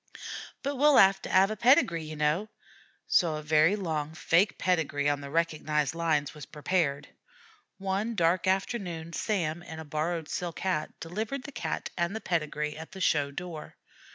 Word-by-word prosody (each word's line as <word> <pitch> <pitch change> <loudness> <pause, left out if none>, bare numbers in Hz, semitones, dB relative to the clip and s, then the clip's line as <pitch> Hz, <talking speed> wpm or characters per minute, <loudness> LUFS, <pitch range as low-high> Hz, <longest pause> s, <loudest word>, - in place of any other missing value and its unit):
"But 280 0 -2
we'll 295 +1 +5
'ave 195 0 +6
to - - -7
'ave 195 +3 +5
a - - -6
pedigree, 225 - +4
ye 155 0 -7
kneow." 150 +7 +1 0.6
So 165 -4 +3
a 155 - -5
very 155 +5 +4
long 160 -6 -3
fake 175 +6 +2
pedigree 160 -5 +1
on 145 -1 +1
the 140 - -7
recognized 155 -2 0
lines 160 -4 0
was 150 -3 -10
prepared. 150 -2 -1 0.7
One 195 +4 -2
dark 170 0 +2
afternoon 185 -4 -1
Sam, 175 -6 -1
in 160 -2 -9
a 160 - -7
borrowed 155 +2 -2
silk 175 -2 -4
hat, 180 -5 -2
delivered 220 +10 -4
the 285 - -8
Cat 245 - -4
and 175 +3 -1
the - - -2
pedigree 150 -5 -2
at 160 +1 -9
the 190 - -8
show 145 -5 +2
door. 165 +2 -7
165 Hz, 170 wpm, -29 LUFS, 155-190 Hz, 0.7 s, ave